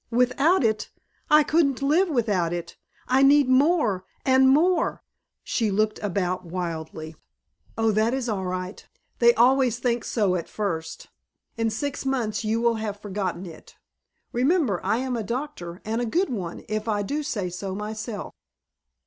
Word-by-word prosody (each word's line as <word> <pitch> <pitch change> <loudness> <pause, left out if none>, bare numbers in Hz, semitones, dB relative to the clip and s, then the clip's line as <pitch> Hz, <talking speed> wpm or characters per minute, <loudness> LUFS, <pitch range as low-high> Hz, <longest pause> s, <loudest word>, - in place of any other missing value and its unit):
"Without 250 +8 +3
it? 215 -2 0 0.4
I 300 0 +7
couldn't 285 -4 +1
live 335 +7 +3
without 205 - 0
it. 170 0 -5 0.3
I 260 +1 +3
need 280 0 +6
more 260 - +3 0.2
and 265 0 +5
more 330 +5 +2 0.2
" - - -58
She 225 -2 0
looked 215 +2 0
about 185 -3 -1
wildly. 160 -2 -5 0.6
"Oh, 225 0 +2
that 215 +2 +2
is 260 -1 -2
all 200 -4 -2
right. 185 +1 -4 0.4
They 235 0 +6
always 255 0 +4
think 240 -1 -1
so 205 -5 +1
at 170 - -4
first. 170 -7 -4 0.5
In 225 -1 0
six 285 +6 -3
months 245 -6 -1
you 220 +1 0
will 235 -1 +2
have 205 -2 -4
forgotten 190 -3 -4
it. 165 -3 -12 0.6
Remember, 255 - +1
I 205 +4 +1
am 255 0 -2
a 230 - -2
doctor 235 - -5
and 225 +2 -1
a 240 - -1
good 355 - 0
one, 180 -7 -5
if 215 0 -3
I 205 -2 0 0.2
say 205 -11 -3
so 190 +2 -5
myself." 215 0 -5
220 Hz, 155 wpm, -25 LUFS, 195-265 Hz, 0.6 s, I